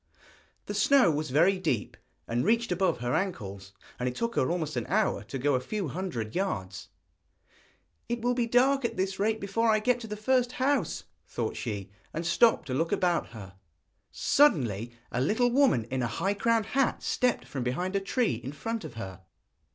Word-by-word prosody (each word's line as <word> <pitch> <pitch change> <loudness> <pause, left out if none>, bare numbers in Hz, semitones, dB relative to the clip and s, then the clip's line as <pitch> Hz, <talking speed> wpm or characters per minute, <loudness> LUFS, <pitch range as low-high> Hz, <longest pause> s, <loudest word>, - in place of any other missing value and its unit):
The 205 - -4
snow 210 0 +5
was 155 0 -2
very 170 +8 +3
deep, 135 - -1 0.3
and 120 +1 0
reached 230 0 +2
above 180 -7 +1
her 120 0 -1
ankles, 100 - -3 0.3
and 125 0 0
it 125 - -7
took 235 0 -2
her 130 - +2
almost 160 -4 -2
an 120 - -2
hour 210 +2 +1
to 135 - -5
go 140 +2 +1
a 130 - +2
few 185 +6 -3
hundred 125 - -4
yards. 95 - -3 1.2
'It 240 0 -1
will 245 +2 +1
be 240 -1 0
dark 265 +3 +3
at 235 - -2
this 190 +1 -1
rate 220 +2 +1
before 220 +3 0
I 215 - +5
get 245 +3 +1
to 225 - -8
the 210 0 -5
first 250 +2 +1
house,' 260 - 0 0.2
thought 115 -2 -3
she, 100 -4 -5 0.2
and 165 +2 -3
stopped 225 +7 +4
to 130 - -4
look 165 +5 0
about 175 -2 +1
her. 100 -4 -11 0.5
Suddenly 120 - +2 0.2
a 125 - -1
little 220 - +2
woman 250 - +4
in 130 0 -1
a 120 - 0
high 195 +12 -1
crowned 225 +1 +1
hat 265 +3 0
stepped 250 -1 0
from 135 - -5
behind 175 +11 -2
a - - +3
tree 195 - 0
in 135 - -5
front 225 +9 -4
of 120 - -8
her. 95 -5 -7
185 Hz, 190 wpm, -28 LUFS, -, 1.2 s, snow